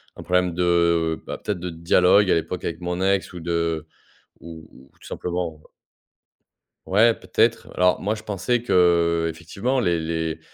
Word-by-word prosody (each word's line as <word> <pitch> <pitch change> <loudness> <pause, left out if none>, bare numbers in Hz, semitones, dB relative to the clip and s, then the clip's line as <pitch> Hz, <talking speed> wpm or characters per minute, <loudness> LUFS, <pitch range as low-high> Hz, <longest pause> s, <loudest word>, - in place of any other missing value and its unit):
un - - -9
problème 90 -1 +1
de, 85 -2 +1
bah, - - -6
peut-être 105 -4 -3
de 90 0 -5
dialogue 90 +4 +3
à - - +4
l'époque 85 +2 -3
avec 85 +1 -4
mon 90 +1 -3
ex 95 0 0
ou 90 - -7
de 85 -2 -2 0.5
ou 80 -2 -11
ou 65 +1 -18
tout - - -14
simplement 85 -3 -4 1.3
Ouais, 110 +4 +4
peut-être. - - 0
Alors 90 0 +3
moi, 105 +3 -1
je 110 - -10
pensais 110 +4 -1
que, 120 - -2 0.5
heu, - - -1
effectivement 95 +11 -3
«les 85 -8 +1
les 80 0 -3
90 Hz, 165 wpm, -23 LUFS, 80-95 Hz, 1.3 s, à